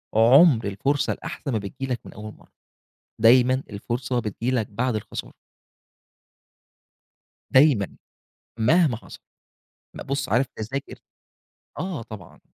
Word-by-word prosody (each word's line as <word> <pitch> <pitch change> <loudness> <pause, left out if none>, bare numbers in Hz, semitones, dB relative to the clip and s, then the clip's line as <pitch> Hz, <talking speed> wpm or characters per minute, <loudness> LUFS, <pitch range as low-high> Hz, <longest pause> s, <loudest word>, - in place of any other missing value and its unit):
عُمْر 120 - +6
الفرصة 135 +9 0
الأحسن 140 - -6
ما 115 - 0
بتيجي 130 +6 -6
لك 120 - -4
من - - -11
أول 105 0 -9
مَرّة، - - -22 0.7
دايمًا 125 +3 +5
الفرصة 120 +4 -3
بتيجي 115 +3 -3
لك 115 -5 0
بعد 115 +2 -1
الخسارة. 105 - -6 2.2
دايمًا، 130 -8 +4 0.6
مهما 145 +3 +3
حصل، - - -13 0.8
م - - -6
بُص 140 -1 -3
عارف 125 +5 +2
تذاكر 130 +6 -5 0.8
آه، 180 -9 -4
طبعًا. 110 -6 -12
125 Hz, 115 wpm, -24 LUFS, 110-135 Hz, 2.2 s, عُمْر